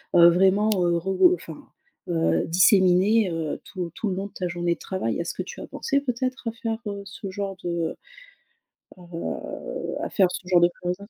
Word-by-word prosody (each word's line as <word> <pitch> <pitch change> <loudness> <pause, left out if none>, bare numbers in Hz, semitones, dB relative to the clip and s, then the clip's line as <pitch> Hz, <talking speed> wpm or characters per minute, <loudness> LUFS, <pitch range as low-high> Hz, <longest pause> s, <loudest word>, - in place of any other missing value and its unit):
heu, 170 -1 +9
vraiment, 190 +4 +3
heu, 175 -2 +2
regrou 190 - +4
enfin, - - -10 0.5
heu, 165 -1 +1
disséminé 190 +4 +4
heu, 165 -2 -3
tout 180 -3 -6
tout 215 - -2
le 185 - -2
long 195 +1 -3
de - - -20
ta 180 - -3
journée 175 0 0
de - - -11
travail. 150 - -3
Est-ce 170 - -3
que - - -4
tu - - -9
as - - -7
pensé 280 0 -1
peut-être 255 -2 -2
à - - -4
faire, 225 -1 -4
heu, 200 -1 -4
ce 195 0 -7
genre 195 0 -4
de, 170 -2 -2 1.0
heu - - -17
heu 180 - -5
à - - -2
faire 190 -3 +3
ce 180 - -6
genre 180 -1 +5
de 175 - +5
choses? 180 0 -1
185 Hz, 200 wpm, -25 LUFS, 175-205 Hz, 1.0 s, heu